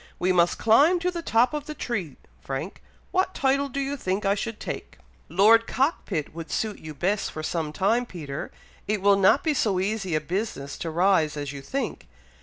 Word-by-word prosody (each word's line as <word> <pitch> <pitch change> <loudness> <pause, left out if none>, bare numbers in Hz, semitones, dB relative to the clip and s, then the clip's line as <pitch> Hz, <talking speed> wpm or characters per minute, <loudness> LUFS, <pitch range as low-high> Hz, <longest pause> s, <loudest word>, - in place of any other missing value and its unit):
"We 185 +1 +1
must 175 -1 +3
climb 285 +11 +5
to 360 +1 +1
the 340 -1 -4
top 245 -3 +2
of 300 0 -4
the 305 - -5
tree, 195 - -3 0.3
Frank! 135 +7 -5 0.3
What 375 0 +1
title 275 +1 +1
do 275 - -4
you 275 +1 -1
think 195 -5 -2
I 195 - +4
should 220 +2 -4
take?" - - -6 0.3
"Lord 215 +7 +5
Cockpit 235 - -1
would 165 0 -7
suit 215 -2 -2
you 155 -1 -9
best 195 +7 0
for 155 - -6
some 160 -1 -2
time, 225 +9 +1
Peter! 150 -8 -6 0.4
It 210 -2 -1
will 200 0 +6
not 195 +8 +4
be 315 - +2
so 205 -9 +1
easy 195 -3 -1
a - - +3
business 155 -4 -4
to 165 - -3
rise 165 -3 +2
as 145 -1 -4
you 140 - -7
think. 275 - -4
200 Hz, 200 wpm, -25 LUFS, 165-245 Hz, 0.4 s, will